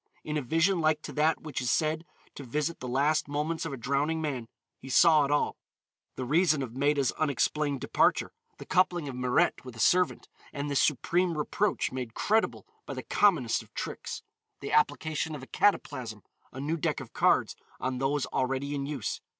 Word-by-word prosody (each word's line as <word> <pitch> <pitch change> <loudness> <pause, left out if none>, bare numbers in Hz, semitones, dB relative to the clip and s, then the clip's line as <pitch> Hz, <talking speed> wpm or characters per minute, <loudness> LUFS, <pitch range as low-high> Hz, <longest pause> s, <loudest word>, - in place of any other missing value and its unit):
In 150 - -4
a 150 - 0
vision 165 +7 +2
like 155 -1 +2
to - - -7
that 155 +2 +2
which 155 -4 -4
is 125 - -1
said 160 +2 0 0.3
to 140 - -8
visit 150 +6 -2
the 125 - -6
last 145 +6 +1
moments 150 +3 -2
of - - -6
a 135 - -5
drowning 140 +6 0
man, 135 -7 -3 0.3
he 135 - -10
saw 155 +1 +6
it - - -3
all: 145 0 +1 0.6
the 130 - -4
reason 155 +1 +3
of 120 -2 -7
Maida's 140 -1 +2
unexplained 145 -1 0
departure, - - +2 0.3
the - - -10
coupling 180 -4 +2
of 135 - -5
Mirette 125 0 +1
with 125 -2 -10
a - - -11
servant, 180 +5 +2 0.2
and 145 0 -4
this 140 - +3
supreme 170 +3 +1
reproach 195 +7 0
made 125 -3 -5
credible 220 +1 +1 0.2
by - - -5
the - - -5
commonest 165 - +2
of - - -17
tricks, - - -5 0.4
the 140 - -6
application 150 +1 +1
of 135 - -8
a - - -10
cataplasm, 125 - 0 0.3
a 130 - -8
new 155 +4 -1
deck 150 - -1
of - - -10
cards - - +2 0.2
on 130 -1 -2
those 135 +1 0
already 135 +2 -1
in 140 -1 -3
use. 140 -7 -3
145 Hz, 190 wpm, -29 LUFS, 130-160 Hz, 0.6 s, saw